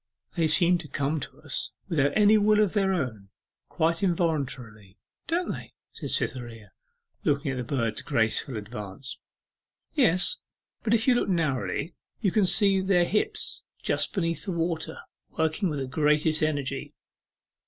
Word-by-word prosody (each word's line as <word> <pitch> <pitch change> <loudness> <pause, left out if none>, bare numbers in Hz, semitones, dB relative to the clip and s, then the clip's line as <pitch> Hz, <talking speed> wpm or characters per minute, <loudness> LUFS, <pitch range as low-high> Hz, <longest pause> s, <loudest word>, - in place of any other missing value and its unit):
'They 165 -3 +2
seem 175 +3 +6
to 165 - -7
come 145 +2 -1
to - - -8
us - - -2
without 145 -3 +2
any 210 0 +6
will 210 0 +4
of 210 -4 +2
their 195 -2 +2
own 120 - -3 0.4
quite 165 +3 0
involuntarily 135 - -2 0.3
don't 345 +2 0
they?' - - -8 0.2
said - - -7
Cytherea, 115 -5 -2 0.5
looking 140 -1 +1
at 130 - -4
the 125 - -2
birds' 115 -4 -2
graceful 110 +2 0
advance. 105 +3 -7 0.7
'Yes, 245 - +3 0.4
but 225 0 +2
if 225 +2 0
you 255 - +6
look 240 - 0
narrowly 165 -1 -1 0.3
you 200 -5 +1
can 210 0 +3
see 195 0 +4
their 190 -2 +3
hips 415 - -1 0.2
just - - 0
beneath 165 -5 -2
the - - -2
water, 165 -1 -2 0.4
working 160 +4 +1
with 150 - -3
the 135 - -2
greatest 150 +3 +2
energy. 145 -3 -2
160 Hz, 150 wpm, -27 LUFS, 135-190 Hz, 0.7 s, seem